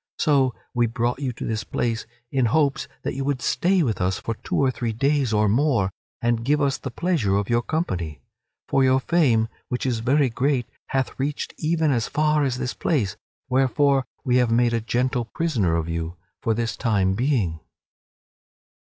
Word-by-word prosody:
So 135 Hz, -6 st, +2 dB, 0.2 s
we 120 Hz, -1 st, +2 dB
brought 120 Hz, +3 st, -1 dB
you 135 Hz, -3 st, -1 dB
to -, -, -6 dB
this 110 Hz, -1 st, -2 dB
place 115 Hz, -2 st, -2 dB, 0.2 s
in 130 Hz, -2 st, +2 dB
hopes 145 Hz, +1 st, +1 dB, 0.2 s
that -, -, -2 dB
you 135 Hz, -, -3 dB
would 140 Hz, -1 st, 0 dB
stay 180 Hz, +8 st, +2 dB
with 110 Hz, -9 st, -1 dB
us 90 Hz, +1 st, +1 dB
for 115 Hz, -, -3 dB
two -, -, -5 dB
or 135 Hz, -2 st, +3 dB
three 120 Hz, -2 st, -3 dB
days 135 Hz, +1 st, +1 dB
or 105 Hz, 0 st, +3 dB
more, 115 Hz, -4 st, +2 dB, 0.3 s
and 120 Hz, -1 st, +1 dB
give 145 Hz, +4 st, +2 dB
us 140 Hz, -2 st, +1 dB
the 135 Hz, -, -5 dB
pleasure 135 Hz, -, 0 dB
of 100 Hz, +2 st, -1 dB
your 120 Hz, 0 st, +3 dB
company. 90 Hz, -, -2 dB, 0.5 s
For 135 Hz, -, +3 dB
your 130 Hz, 0 st, +4 dB
fame, 130 Hz, -8 st, +2 dB, 0.2 s
which 125 Hz, -, -2 dB
is 120 Hz, -3 st, 0 dB
very 135 Hz, +5 st, +3 dB
great, 130 Hz, +1 st, +1 dB, 0.2 s
hath 135 Hz, 0 st, -2 dB
reached 145 Hz, +2 st, -2 dB
even 160 Hz, -1 st, +1 dB
as 120 Hz, -4 st, 0 dB
far 150 Hz, 0 st, +2 dB
as 130 Hz, -3 st, 0 dB
this 125 Hz, 0 st, -2 dB
place, 105 Hz, -, 0 dB, 0.3 s
wherefore 135 Hz, +1 st, +2 dB, 0.2 s
we 125 Hz, -1 st, +3 dB
have 125 Hz, -2 st, +3 dB
made 120 Hz, +1 st, +3 dB
a 115 Hz, -, +1 dB
gentle 125 Hz, +2 st, 0 dB
prisoner 120 Hz, -, 0 dB
of 85 Hz, -1 st, -1 dB
you 85 Hz, 0 st, -3 dB, 0.3 s
for 115 Hz, -, +1 dB
this 115 Hz, 0 st, -1 dB
time 100 Hz, -6 st, +1 dB
being." 110 Hz, -, 0 dB
125 Hz, 185 wpm, -24 LUFS, 115-140 Hz, 0.5 s, your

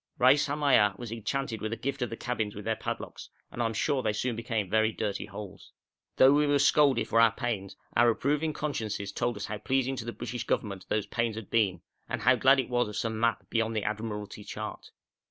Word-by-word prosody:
Reis 135 Hz, +4 st, +5 dB
Hamaya 140 Hz, -9 st, +3 dB
was 120 Hz, -2 st, -7 dB
enchanted 115 Hz, 0 st, -3 dB
with 110 Hz, -, -3 dB
a -, -, -1 dB
gift 135 Hz, +1 st, -3 dB
of 125 Hz, -, 0 dB
the 115 Hz, -, -6 dB
cabins 110 Hz, -5 st, -3 dB
with 105 Hz, -, -8 dB
their 110 Hz, 0 st, +1 dB
padlocks, -, -, -6 dB, 0.2 s
and 120 Hz, -, -4 dB
I -, -, +2 dB
am 115 Hz, -, -3 dB
sure 140 Hz, +4 st, +1 dB
they 110 Hz, -3 st, 0 dB
soon 120 Hz, +3 st, -1 dB
became 115 Hz, -3 st, -2 dB
very 110 Hz, +3 st, +2 dB
dirty 105 Hz, -3 st, -3 dB
holes. 100 Hz, -2 st, -10 dB, 0.4 s
Though 130 Hz, +1 st, +7 dB
we 150 Hz, 0 st, +3 dB
were 145 Hz, 0 st, +4 dB
scolded 145 Hz, -1 st, +4 dB
for 115 Hz, -, +4 dB
our 115 Hz, -1 st, +6 dB
pains, 115 Hz, -5 st, -3 dB, 0.2 s
our 120 Hz, 0 st, +6 dB
approving 150 Hz, +7 st, 0 dB
consciences 110 Hz, -10 st, -3 dB
told 120 Hz, +2 st, -1 dB
us 100 Hz, -, -4 dB
how 105 Hz, 0 st, -5 dB
pleasing 135 Hz, +3 st, 0 dB
to 115 Hz, -, -5 dB
the 120 Hz, -, -3 dB
British 120 Hz, 0 st, -5 dB
Government 100 Hz, -3 st, -2 dB
those 105 Hz, -1 st, 0 dB
pains 115 Hz, -2 st, -1 dB
had 110 Hz, -3 st, -8 dB
been, 100 Hz, -6 st, +2 dB, 0.3 s
and -, -, -3 dB
how -, -, +6 dB
glad 135 Hz, +1 st, +5 dB
it 130 Hz, -, -1 dB
was 120 Hz, -1 st, +1 dB
of 105 Hz, -, -8 dB
some 110 Hz, -1 st, -2 dB
map 115 Hz, -1 st, 0 dB
beyond 115 Hz, -1 st, 0 dB
the 105 Hz, -, 0 dB
Admiralty 105 Hz, -1 st, -4 dB
chart. 100 Hz, -, -7 dB
115 Hz, 225 wpm, -29 LUFS, 105-130 Hz, 0.4 s, Though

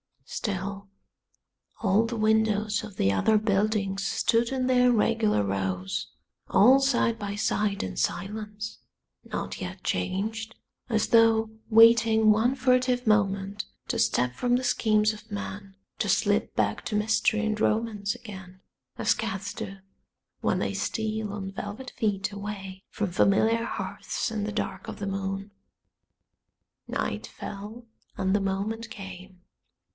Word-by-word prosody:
Still 200 Hz, 0 st, -4 dB, 0.9 s
all 205 Hz, +2 st, +3 dB
the 235 Hz, +1 st, -3 dB
windows 215 Hz, -1 st, +2 dB
of 210 Hz, -3 st, -9 dB
the 95 Hz, -, +2 dB
other 100 Hz, -, +3 dB
buildings 200 Hz, -2 st, 0 dB
stood 230 Hz, +2 st, +2 dB
in 260 Hz, -1 st, -1 dB
their 250 Hz, -1 st, +4 dB
regular 220 Hz, -, +2 dB
rows 95 Hz, -1 st, -2 dB, 0.4 s
all 255 Hz, +6 st, +6 dB
side 245 Hz, -4 st, +2 dB
by 205 Hz, -1 st, -4 dB
side 210 Hz, -1 st, 0 dB
in 90 Hz, -1 st, -5 dB
silence, 210 Hz, +3 st, -3 dB, 0.5 s
not -, -, -4 dB
yet -, -, -6 dB
changed, 220 Hz, +4 st, -2 dB, 0.3 s
as 220 Hz, -2 st, +1 dB
though 225 Hz, -1 st, +4 dB, 0.2 s
waiting 225 Hz, -1 st, +6 dB
one 230 Hz, +5 st, +3 dB
furtive 255 Hz, -1 st, +2 dB
moment 200 Hz, -1 st, +1 dB, 0.2 s
to -, -, 0 dB
step 125 Hz, 0 st, +2 dB
from 245 Hz, -, +1 dB
the 255 Hz, -, 0 dB
schemes 215 Hz, -3 st, +3 dB
of 215 Hz, +1 st, -13 dB
man, 200 Hz, -1 st, -6 dB, 0.2 s
to -, -, 0 dB
slip -, -, +1 dB
back -, -, 0 dB
to 215 Hz, -, -2 dB
mystery 220 Hz, +1 st, +2 dB
and 215 Hz, -1 st, -1 dB
romance 215 Hz, -2 st, 0 dB
again 190 Hz, -4 st, -11 dB, 0.4 s
as -, -, +3 dB
cats 195 Hz, +1 st, -4 dB
do 195 Hz, -3 st, -6 dB, 0.6 s
when -, -, +1 dB
they -, -, -1 dB
steal 220 Hz, -2 st, -2 dB
on 195 Hz, -2 st, -5 dB
velvet 205 Hz, +6 st, -6 dB
feet 205 Hz, -3 st, 0 dB
away 200 Hz, -2 st, -6 dB
from 205 Hz, -4 st, -2 dB
familiar 220 Hz, +5 st, +3 dB
hearths -, -, -3 dB
in 210 Hz, -2 st, -2 dB
the 210 Hz, -, -3 dB
dark 215 Hz, -, -3 dB
of -, -, -6 dB
the 200 Hz, -, -4 dB
moon. 195 Hz, +1 st, -3 dB, 1.4 s
Night -, -, -3 dB
fell, 210 Hz, +4 st, -8 dB, 0.3 s
and 190 Hz, 0 st, +1 dB
the 205 Hz, -, +2 dB
moment 205 Hz, +4 st, -2 dB
came. 190 Hz, -3 st, -9 dB
210 Hz, 135 wpm, -27 LUFS, 195-225 Hz, 1.4 s, all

